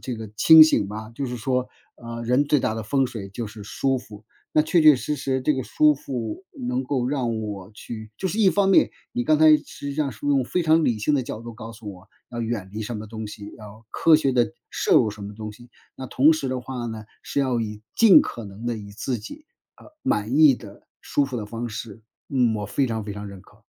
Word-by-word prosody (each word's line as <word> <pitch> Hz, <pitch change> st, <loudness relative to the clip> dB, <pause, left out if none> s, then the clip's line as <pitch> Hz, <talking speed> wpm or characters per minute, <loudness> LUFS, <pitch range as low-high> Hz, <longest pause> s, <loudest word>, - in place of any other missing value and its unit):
这 130 Hz, -, -4 dB
个 110 Hz, -1 st, -7 dB
清 160 Hz, +8 st, +9 dB
醒 155 Hz, -10 st, +4 dB
吧。 110 Hz, +1 st, -7 dB
就 140 Hz, -, -3 dB
是 125 Hz, -1 st, -4 dB
说， 125 Hz, +1 st, -1 dB, 0.3 s
呃， 115 Hz, 0 st, -7 dB
人 125 Hz, +4 st, +2 dB
最 145 Hz, -1 st, +2 dB
大 110 Hz, -, -1 dB
的 110 Hz, -, -4 dB
风 135 Hz, +4 st, +1 dB
水 100 Hz, -5 st, -8 dB
就 115 Hz, +3 st, -5 dB
是 105 Hz, 0 st, -10 dB
舒 135 Hz, +5 st, 0 dB
服， 110 Hz, -4 st, -10 dB, 0.3 s
那 155 Hz, -, +4 dB
确 160 Hz, +2 st, +2 dB
确 155 Hz, -1 st, +8 dB
实 150 Hz, +3 st, -3 dB
实 130 Hz, -1 st, -1 dB
这 150 Hz, +4 st, +1 dB
个 130 Hz, -, -2 dB
舒 150 Hz, +4 st, +3 dB
服 125 Hz, -, -5 dB, 0.2 s
能 125 Hz, +1 st, -1 dB
够 130 Hz, -2 st, -1 dB
让 120 Hz, -5 st, -1 dB
我 100 Hz, -3 st, -6 dB
去 110 Hz, 0 st, -9 dB
就 190 Hz, -, -1 dB
是 205 Hz, -, -3 dB
一 200 Hz, -4 st, +5 dB
方 200 Hz, 0 st, +2 dB
面， 195 Hz, -, +5 dB, 0.2 s
你 120 Hz, -, -2 dB
刚 155 Hz, +2 st, +3 dB
才 155 Hz, -1 st, +7 dB
实 140 Hz, -, -9 dB
际 140 Hz, -, -4 dB
上 145 Hz, -2 st, -1 dB
是 110 Hz, +6 st, -8 dB
用 140 Hz, -2 st, +2 dB
非 180 Hz, +8 st, -1 dB
常 160 Hz, 0 st, +4 dB
理 115 Hz, -3 st, +1 dB
性 105 Hz, +8 st, +1 dB
的 135 Hz, -, +1 dB
角 120 Hz, -3 st, -6 dB
度 115 Hz, 0 st, -9 dB
告 115 Hz, 0 st, -9 dB
诉 110 Hz, -2 st, -9 dB
我， 90 Hz, -, -17 dB, 0.2 s
要 120 Hz, -1 st, -4 dB
远 110 Hz, -4 st, -3 dB
离 110 Hz, +1 st, -4 dB
什 115 Hz, +2 st, -5 dB
么 110 Hz, -, -7 dB
东 110 Hz, 0 st, -7 dB
西， 105 Hz, -1 st, -10 dB
要 110 Hz, +1 st, -13 dB
科 165 Hz, -1 st, +5 dB
学 140 Hz, -3 st, +1 dB
地 120 Hz, -2 st, +1 dB, 0.2 s
摄 -, -, +2 dB
入 110 Hz, -, +4 dB
什 105 Hz, 0 st, -8 dB
么 100 Hz, +1 st, -7 dB
东 110 Hz, 0 st, -6 dB
西。 120 Hz, +3 st, -16 dB, 0.3 s
那 130 Hz, -, -7 dB
同 145 Hz, +6 st, +4 dB
时 155 Hz, -4 st, -2 dB
的 130 Hz, 0 st, -2 dB
话 125 Hz, -1 st, -6 dB
呢， 110 Hz, -2 st, -6 dB, 0.2 s
是 -, -, -4 dB
要 130 Hz, -4 st, +1 dB
以 105 Hz, -1 st, -5 dB
尽 225 Hz, -5 st, +7 dB
可 115 Hz, -, -5 dB
能 100 Hz, +3 st, -9 dB
地 120 Hz, -1 st, -1 dB
以 100 Hz, -2 st, -9 dB
自 115 Hz, +4 st, -3 dB
己， 285 Hz, -, -10 dB, 0.3 s
呃， -, -, -17 dB, 0.2 s
满 105 Hz, +6 st, 0 dB
意 150 Hz, -5 st, +7 dB
的、 100 Hz, -3 st, -14 dB
舒 145 Hz, -, 0 dB
服 130 Hz, -2 st, -5 dB
的 105 Hz, -3 st, -4 dB
方 115 Hz, +3 st, -5 dB
式。 110 Hz, 0 st, -8 dB, 0.3 s
嗯， 125 Hz, -5 st, +2 dB
我 105 Hz, -, -4 dB
非 135 Hz, +6 st, 0 dB
常 110 Hz, -3 st, -3 dB
非 105 Hz, -, -5 dB
常 105 Hz, 0 st, -7 dB
认 100 Hz, -1 st, -10 dB
可。 -, -, -23 dB
120 Hz, 270 characters per minute, -24 LUFS, 110-140 Hz, 0.3 s, 清